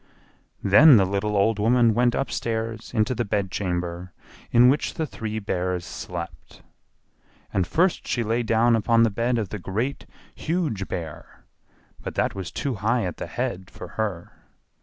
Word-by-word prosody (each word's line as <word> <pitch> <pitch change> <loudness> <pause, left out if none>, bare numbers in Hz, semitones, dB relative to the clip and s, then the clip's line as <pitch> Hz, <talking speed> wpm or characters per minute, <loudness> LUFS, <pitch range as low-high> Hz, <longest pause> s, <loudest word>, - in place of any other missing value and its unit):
Then 130 +7 +8
the 95 - +4
little 100 +2 -1
old 105 +2 +2
woman 115 +1 +4
went 120 +1 +2
upstairs 115 -4 -3
into 110 +1 +1
the 120 - -1
bedchamber 90 -3 -3 0.4
in 120 +1 +6
which 140 +4 +1
the 160 - -1
three 110 -6 -5
Bears 90 -4 -2
slept. 85 -3 -8 0.9
And 95 -3 +1
first 175 - +1
she 120 - 0
lay 115 +2 0
down 115 +1 +3
upon 115 +1 +3
the 115 - +3
bed 120 +4 0
of 105 -5 -2
the 105 - -5
Great, 110 +10 -3 0.3
Huge 155 - -2
Bear, 80 -3 -7 0.6
but - - -6
that - - 0
was 95 -4 -5
too 135 - -2
high 115 +1 +1
at 90 - -4
the - - -5
head 95 0 -4
for 90 - -10
her. 95 -5 -4
110 Hz, 160 wpm, -24 LUFS, 95-120 Hz, 0.9 s, Then